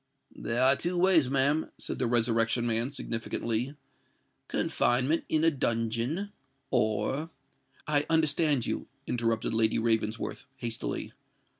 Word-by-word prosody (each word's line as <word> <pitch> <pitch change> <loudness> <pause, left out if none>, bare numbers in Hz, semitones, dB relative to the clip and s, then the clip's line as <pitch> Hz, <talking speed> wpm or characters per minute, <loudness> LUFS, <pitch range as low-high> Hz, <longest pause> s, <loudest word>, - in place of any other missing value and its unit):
"There 120 +3 -1
are 135 +1 +6
two 175 +4 -2
ways, 175 -7 +4
ma'am," 140 +3 +3
said - - -6
the 125 - +1
Resurrection 115 0 +2
Man, 115 +2 0
significantly: 115 0 -2 0.7
"confinement 130 +7 +1
in 155 0 +1
a 165 - +5
dungeon, 120 - -1 0.4
or——" 110 +9 0 0.6
"I 145 -1 +1
understand 155 -4 +2
you," - - -3 0.2
interrupted 115 -2 -1
Lady 110 -1 +2
Ravensworth, 110 +2 -1
hastily. 115 -2 -4
125 Hz, 115 wpm, -29 LUFS, 115-150 Hz, 0.7 s, are